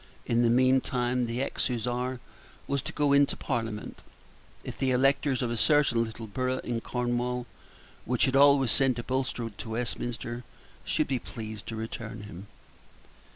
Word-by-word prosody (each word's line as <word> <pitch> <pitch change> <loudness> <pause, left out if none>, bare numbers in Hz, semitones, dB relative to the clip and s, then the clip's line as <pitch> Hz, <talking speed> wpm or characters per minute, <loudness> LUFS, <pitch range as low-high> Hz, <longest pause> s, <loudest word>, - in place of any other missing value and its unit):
In 120 0 +2
the 120 - +4
meantime 125 0 +2
the 120 +3 -1
ex - - -1
Hussar 125 +1 -2 0.5
was 140 -1 -1
to - - -5
go 145 -1 +2
into 140 0 +4
Parliament, 115 -4 -3 0.6
if - - -6
the 135 - 0
electors 135 +1 +2
of 120 - -1
a - - -1
certain 140 -3 +4
little 110 0 -6
borough 130 +4 -1
in 120 -1 -2
Cornwall, 125 0 -1 0.6
which 125 0 +2
had 130 - 0
always 140 -3 +6
sent 135 -3 +3
a 120 - -3
Bulstrode 125 -4 -3
to 115 - -6
Westminster, 120 +1 -3 0.4
should - - +1
be 130 -2 0
pleased 110 -2 -8
to 115 - -4
return 110 -1 -6
him. 100 -1 -9
125 Hz, 155 wpm, -28 LUFS, 115-130 Hz, 0.6 s, always